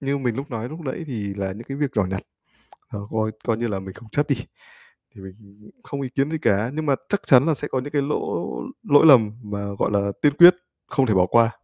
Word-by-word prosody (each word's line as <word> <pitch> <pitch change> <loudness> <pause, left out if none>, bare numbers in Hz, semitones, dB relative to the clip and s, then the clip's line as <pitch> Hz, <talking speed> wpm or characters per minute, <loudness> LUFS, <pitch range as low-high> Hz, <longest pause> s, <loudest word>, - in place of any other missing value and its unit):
Như 140 0 -1
mình 125 -4 -2
lúc 140 +3 -6
nói 115 -1 -4
lúc 155 +4 -9
nãy 150 +2 -5
thì 105 -7 -5
là 95 -1 -3
những 115 +4 -10
cái 135 - -5
việc 145 -1 -1
nhỏ 105 - +3
nhặt, 95 +1 -4 0.7
ờ, 105 - -7
coi 110 0 -1 0.2
coi 115 -2 +1
như 120 +1 -2
là 100 -3 -3
mình 95 0 -9
không 115 +1 -13
chấp 145 +1 +1
đi, 140 - +2 0.8
thì - - -14
mình 100 +2 -15
không 140 - -5
ý 130 - -3
kiến 135 +3 -1
gì 160 - -2
cả. 105 -1 +1
Nhưng 155 0 -3
mà 140 - +3
chắc 205 - +1
chắn 130 +3 +6
là 160 - +2
sẽ 145 - -3
có 130 - -1
những 145 +3 -8
cái 145 -1 +1
lỗ 145 +2 -2 0.4
lỗi 145 +3 +5
lầm 120 -8 +7
mà, 100 -1 -5
gọi - - 0
là, 100 0 0
tiên 145 - +4
quyết 175 +1 +10 0.3
không 135 -2 +1
thể 110 - +1
bỏ 90 -1 +4
qua. 115 +3 +4
120 Hz, 260 wpm, -22 LUFS, 105-140 Hz, 0.8 s, quyết